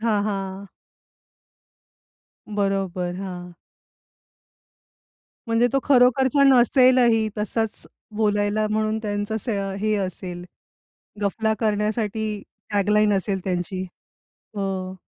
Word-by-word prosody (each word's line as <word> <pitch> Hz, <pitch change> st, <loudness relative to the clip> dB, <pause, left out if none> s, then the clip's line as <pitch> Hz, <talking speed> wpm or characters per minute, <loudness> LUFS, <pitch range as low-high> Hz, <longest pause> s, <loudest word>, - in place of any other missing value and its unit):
हां, 215 Hz, -3 st, +1 dB
हां. 195 Hz, -1 st, -4 dB, 1.8 s
बरोबर. 195 Hz, -3 st, -1 dB
हां. 180 Hz, -2 st, -7 dB, 1.9 s
म्हणजे 230 Hz, +1 st, +3 dB
तो 275 Hz, -, +3 dB
खरोखरचा 265 Hz, +1 st, +4 dB
नसेलही. 250 Hz, -3 st, +5 dB
तसाच 220 Hz, +1 st, -2 dB, 0.3 s
बोलायला 210 Hz, 0 st, +1 dB
म्हणून 215 Hz, 0 st, 0 dB
त्यांचं 205 Hz, 0 st, -2 dB
असं 200 Hz, -3 st, -2 dB
हे 215 Hz, +1 st, +1 dB
असेल, 185 Hz, -2 st, -4 dB, 0.8 s
गफला 220 Hz, +2 st, 0 dB
करण्यासाठी 215 Hz, 0 st, -1 dB, 0.3 s
टॅग 205 Hz, -1 st, +1 dB
लाईन 210 Hz, 0 st, +4 dB
असेल 190 Hz, 0 st, -1 dB
त्यांची. 185 Hz, 0 st, -2 dB, 0.7 s
हो. 190 Hz, -1 st, -3 dB
210 Hz, 85 wpm, -23 LUFS, 195-220 Hz, 1.9 s, नसेलही